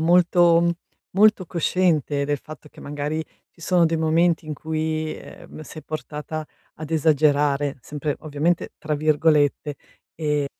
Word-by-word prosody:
molto, 175 0 +5
mhmm, 170 - +3 0.4
molto 210 0 +4
cosciente 165 -4 +1
del 145 0 -1
fatto 150 +2 -12
che - - -15
magari 145 +2 -3 0.3
ci - - -24
sono 175 +1 +3
dei 165 0 +1
momenti 165 +1 +2
in 155 - -4
cui, 155 +1 -2
ehm, - - -12
sei 155 0 -10
portata 155 +1 -6 0.3
ad 155 -1 -8
"esagerare," 145 -2 +2
sempre 145 +3 -4
ovviamente 155 +3 -1
tra 155 -1 -2
virgolette, 150 -1 +2 0.5
ehm 145 -1 +1
155 Hz, 135 wpm, -23 LUFS, 145-165 Hz, 0.5 s, molto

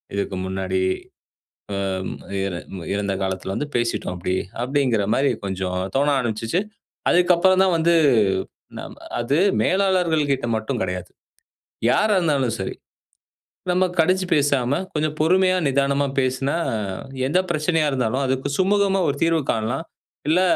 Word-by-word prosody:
இதுக்கு 100 -1 -2
முன்னாடி. 95 0 -2 1.1
அம், 95 0 -3 0.3
இற 95 -2 -3 0.4
இறந்த 100 -1 -1
காலத்துல 95 0 -3
வந்து 150 - -3
பேசிட்டோம் 115 -6 -1
அப்படி." 90 +1 -2 0.3
அப்படீங்கிற 125 -6 +1
மாதிரி 140 +1 +2
கொஞ்சம் 95 -1 -3 0.2
தோண 145 +2 +2
ஆரம்பிச்சுச்சு. 115 - -1 0.5
அதுக்கப்பறம்தான் 180 +1 +4
வந்து 170 +1 +3 0.8
ந - - -5 0.4
அது 125 +4 0 0.3
மேலாளர்கள் 180 -6 +2
கிட்ட 130 - -3
மட்டும் 110 +3 -3
கிடையாது. 90 -1 -3 0.8
யாரா 215 +7 +3
இருந்தாலும் 140 -8 +1
சரி, 95 - -3 1.0
நம்ம 185 +1 +3
கடிஞ்சு 185 +3 +3
பேசாம 140 -2 +2
கொஞ்சம் 155 0 -1
பொறுமையா, 185 +3 +4
நிதானமா 140 +1 +1
பேசுனா 130 +3 0 0.7
எந்தப் 185 +5 +1
பிரச்சனையா 155 -1 +1
இருந்தாலும், 130 0 0
அதுக்கு 130 +2 -1
சுமூகமா 195 0 +2
ஒரு 140 - 0
தீர்வு 165 -1 +2
காணலாம். 120 +8 -2 0.4
இல்ல, 170 +4 +4
140 Hz, 120 wpm, -22 LUFS, 110-170 Hz, 1.1 s, அதுக்கப்பறம்தான்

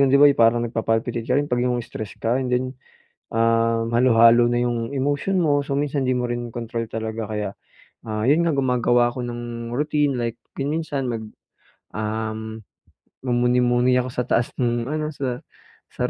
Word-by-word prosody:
yung 140 - +5
'di 140 - +5
ba 145 - +7
yung 120 - -3
parang 120 +1 +4
nagpa-palpitate 115 +1 -1
ka 125 - +3
rin 145 - +2
'pag 125 -3 -1
yung 125 - 0
stressed 110 -2 -7
ka 120 +4 0
and 130 - -2
then, 125 +1 +1 0.7
um, 115 0 +2
halu-halo 120 -1 +5
na 120 0 +1
'yong 120 +2 -2
emotion 145 +7 0
mo. 145 -2 +3
So 140 - -1
minsan 140 -2 -1
di 130 - +2
mo 125 - -1
rin 120 -1 -4
kontrol 115 -1 -4
talaga 110 -1 -4
kaya, 105 -2 -3 0.5
ah, 110 +1 -3
yun 155 +5 +4
nga 170 - +2
gumagawa 120 -2 +2
ako 125 - -4
ng 120 -1 -5
routine 145 0 0
like 115 -1 -2 0.2
kung 140 +3 -1
minsan 145 -5 -2
mag 115 -1 -3 0.7
um, 110 0 -4 0.6
mumuni-muni 125 0 +2
ako 130 - -5
sa 125 0 -2
taas 120 -1 +1
nung 120 0 0
ano 155 0 -2
sa 130 -3 -3 0.5
sa - - -1
120 Hz, 180 wpm, -23 LUFS, 115-130 Hz, 0.7 s, ba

